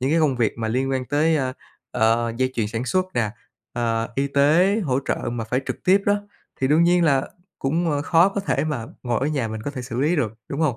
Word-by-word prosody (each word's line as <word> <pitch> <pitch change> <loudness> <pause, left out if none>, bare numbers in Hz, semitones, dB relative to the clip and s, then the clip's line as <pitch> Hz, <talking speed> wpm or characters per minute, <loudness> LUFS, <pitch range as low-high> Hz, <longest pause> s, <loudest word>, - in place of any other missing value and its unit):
những 130 +3 0
cái 165 - +3
công 140 -5 +2
việc 115 -3 +1
mà 110 -1 -2
liên 130 +4 0
quan 130 -1 -1
tới, 155 +5 +2
a, 130 -2 -1 0.4
ờ, 115 0 +2
dây 130 +1 +1
chuyền 110 -3 0
sản 115 +3 -3
xuất 185 +6 +1
nè, 110 -3 +1 0.4
à, 115 -2 -1
y 135 +2 0
tế, 165 +10 +3
hỗ 130 -3 +1
trợ - - +1 0.2
mà 115 -2 -3
phải 125 +4 -1
trực - - -3
tiếp 195 +2 +4
đó, 205 0 +2 0.4
thì 130 - +2
đương 155 +4 +4
nhiên 175 0 +4
là 135 -4 +2 0.3
cũng, 165 +5 0
ờ, 145 -1 0
khó 165 +4 +4
có 200 0 -3
thể 195 - 0
mà 130 -8 -3 0.2
ngồi 120 -2 -1
ở 135 - 0
nhà 140 -7 -1
mình 110 0 -5
có 145 - -3
thể 130 -3 -6
xử 125 -1 -4
lý 155 +5 +2
được, 120 -8 0 0.2
đúng 140 +3 -4
hông? 145 -7 +1
135 Hz, 255 wpm, -23 LUFS, 120-160 Hz, 0.4 s, tiếp